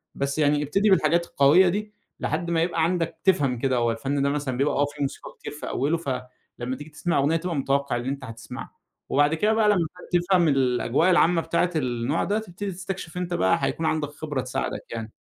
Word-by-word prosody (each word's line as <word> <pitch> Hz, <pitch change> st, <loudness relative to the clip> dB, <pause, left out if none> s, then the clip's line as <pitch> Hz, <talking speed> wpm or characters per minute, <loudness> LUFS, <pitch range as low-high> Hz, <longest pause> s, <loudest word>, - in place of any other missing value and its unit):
بس 140 Hz, +2 st, -2 dB
يعني 145 Hz, 0 st, +3 dB
ابتدي 195 Hz, +9 st, +2 dB
بالحاجات 170 Hz, -1 st, +3 dB
القوية 150 Hz, +7 st, +5 dB
دي 210 Hz, +3 st, -3 dB, 0.3 s
لحد 170 Hz, +3 st, -1 dB
ما 165 Hz, -1 st, +2 dB
يبقى 170 Hz, -1 st, 0 dB
عندك 170 Hz, 0 st, -1 dB
تفهم 140 Hz, -10 st, +2 dB
كده 130 Hz, 0 st, +1 dB
هو 120 Hz, -1 st, +2 dB
الفن 135 Hz, +5 st, -2 dB
ده 140 Hz, -, +2 dB
مثلًا 140 Hz, -3 st, -2 dB
بيبقى 140 Hz, +3 st, +1 dB
آه 145 Hz, -, +3 dB
فيه 145 Hz, 0 st, -9 dB
موسيقى 140 Hz, -, -4 dB
كتير -, -, -7 dB
في 150 Hz, -, -6 dB
أوله 145 Hz, +6 st, 0 dB
فلمّا 125 Hz, -3 st, -6 dB
تيجي 150 Hz, +1 st, -10 dB
تسمع 170 Hz, +1 st, 0 dB
أغنية 145 Hz, +4 st, +2 dB
تبقى 170 Hz, 0 st, -3 dB
متوقِّع 140 Hz, -1 st, 0 dB
اللي 120 Hz, +2 st, -3 dB
أنت 140 Hz, 0 st, -4 dB
هتسمعه، 115 Hz, -1 st, -9 dB, 0.3 s
وبعد 145 Hz, +2 st, +3 dB
كده 210 Hz, +7 st, +2 dB
بقى 220 Hz, -1 st, +3 dB
لمّا 180 Hz, -6 st, +2 dB, 0.3 s
تفهم 175 Hz, 0 st, +3 dB
الأجواء 135 Hz, +4 st, +2 dB
العامة 175 Hz, -1 st, +4 dB
بتاعة 170 Hz, +2 st, 0 dB
النوع 125 Hz, +1 st, -1 dB
ده 210 Hz, +2 st, 0 dB
تبتدي 200 Hz, -1 st, -6 dB
تستكشف 185 Hz, -1 st, -6 dB
أنت 180 Hz, -1 st, -3 dB
بقى 95 Hz, -, +3 dB
هيكون 160 Hz, -, -1 dB
عندك 155 Hz, -2 st, 0 dB
خبرة 145 Hz, -2 st, -4 dB
تساعدك 125 Hz, -, -3 dB
يعني. 115 Hz, -1 st, -5 dB
150 Hz, 200 wpm, -25 LUFS, 135-175 Hz, 0.3 s, القوية